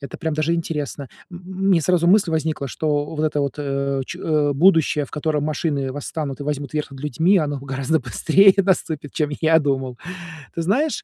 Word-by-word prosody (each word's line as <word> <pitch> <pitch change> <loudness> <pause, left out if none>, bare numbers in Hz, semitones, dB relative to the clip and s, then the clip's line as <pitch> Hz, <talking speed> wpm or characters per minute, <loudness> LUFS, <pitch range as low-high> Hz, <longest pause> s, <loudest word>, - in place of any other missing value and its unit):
это, 140 - -8
прям, 160 -2 -2
даже 155 +2 +1
интересно. 150 -4 -4 0.2
М, 175 - -9
м, 190 +2 -3
мне 180 -4 +4
сразу 170 +1 +2
мысль 195 -1 +4
возникла, 155 -2 -1
что, 145 0 -1
вот 155 0 -1
это 150 -1 0
вот, 140 -2 -2
э, 140 -1 -1
че - - -7
э, 150 -2 +1
будущее, 160 -1 +3
в - - -15
котором 150 -1 -1
машины 145 -3 -1
восстанут 145 0 -5
и - - -3
возьмут 145 0 -4
верх 150 -2 -2
над 135 - -10
людьми, 160 +8 +2
оно 145 -3 -1
гораздо 135 +3 -1
быстрее 165 - +4
наступит, 165 -7 0
чем 150 -2 -1
я 160 0 +5
думал. 135 -4 -2 0.6
Ты 170 - -1
знаешь, 260 - 0
150 Hz, 195 wpm, -21 LUFS, 140-165 Hz, 0.6 s, я